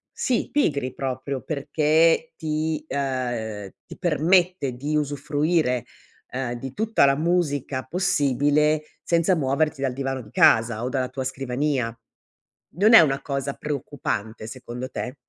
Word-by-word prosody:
sì, 250 Hz, -3 st, 0 dB
pigri 140 Hz, -, 0 dB
proprio 130 Hz, 0 st, -4 dB
perché 155 Hz, -, +2 dB
ti, 155 Hz, -1 st, -2 dB
ehm, 120 Hz, -7 st, -3 dB, 0.2 s
ti -, -, -10 dB
permette 175 Hz, -3 st, +2 dB
di 145 Hz, +5 st, -3 dB
usufruire, 145 Hz, -2 st, 0 dB, 0.4 s
ehm, 125 Hz, -1 st, -3 dB
di 135 Hz, 0 st, -7 dB
tutta 220 Hz, -6 st, +3 dB
la 135 Hz, 0 st, +4 dB
musica 145 Hz, -5 st, 0 dB
possibile 150 Hz, -3 st, +2 dB, 0.2 s
senza 170 Hz, +2 st, +2 dB
muoverti 140 Hz, 0 st, 0 dB
dal 135 Hz, -, 0 dB
divano 135 Hz, 0 st, -3 dB
di 105 Hz, -, -14 dB
casa 115 Hz, 0 st, +4 dB
o 125 Hz, -, -1 dB
dalla 130 Hz, -2 st, -1 dB
tua 130 Hz, 0 st, -4 dB
scrivania? 130 Hz, -2 st, -2 dB, 0.8 s
Non 215 Hz, +5 st, +5 dB
è -, -, +12 dB
una 140 Hz, -4 st, +2 dB
cosa 140 Hz, -1 st, -3 dB
preoccupante 125 Hz, -7 st, -4 dB
secondo 125 Hz, +2 st, -7 dB
te? 125 Hz, +2 st, -5 dB
140 Hz, 130 wpm, -24 LUFS, 130-155 Hz, 0.8 s, è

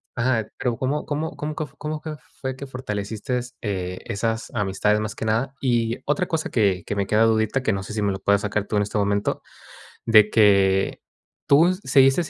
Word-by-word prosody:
Ajá, 115 Hz, -3 st, +1 dB
pero, 120 Hz, -2 st, -1 dB
¿cómo 140 Hz, +3 st, -1 dB
cómo 155 Hz, +2 st, -3 dB
cómo 150 Hz, +1 st, -4 dB
quef 150 Hz, -4 st, -5 dB
cómo 155 Hz, 0 st, -3 dB
que 155 Hz, -1 st, -5 dB, 0.3 s
fue 130 Hz, -1 st, -3 dB
fortaleciste, 125 Hz, 0 st, -4 dB
eh, 90 Hz, -3 st, -3 dB
esas 115 Hz, +3 st, -2 dB
amistades, 105 Hz, 0 st, +1 dB
más 110 Hz, 0 st, -4 dB
que -, -, -4 dB
nada? 115 Hz, +5 st, 0 dB
Y 120 Hz, -3 st, +1 dB
otra 180 Hz, +5 st, 0 dB
cosa 160 Hz, -1 st, -2 dB
que 100 Hz, -6 st, +2 dB
que -, -, -3 dB
me 100 Hz, -1 st, -1 dB
queda 110 Hz, +2 st, +3 dB
dudita, 110 Hz, +3 st, +1 dB
que 115 Hz, -, +1 dB
no 95 Hz, -, -2 dB
sé 95 Hz, -, -7 dB
si 105 Hz, -, -2 dB
me 100 Hz, -, +2 dB
lo 95 Hz, -, -5 dB
puedas 100 Hz, +1 st, +2 dB
sacar 105 Hz, 0 st, -1 dB
tú 105 Hz, -, -1 dB
en 105 Hz, -, +3 dB
este 105 Hz, +1 st, -3 dB
momento, 100 Hz, 0 st, 0 dB, 0.6 s
de 110 Hz, -2 st, +6 dB
que, 100 Hz, -3 st, +3 dB, 0.5 s
¿tú 165 Hz, +6 st, +5 dB
seguiste 135 Hz, +4 st, +4 dB
110 Hz, 195 wpm, -23 LUFS, 100-130 Hz, 0.6 s, de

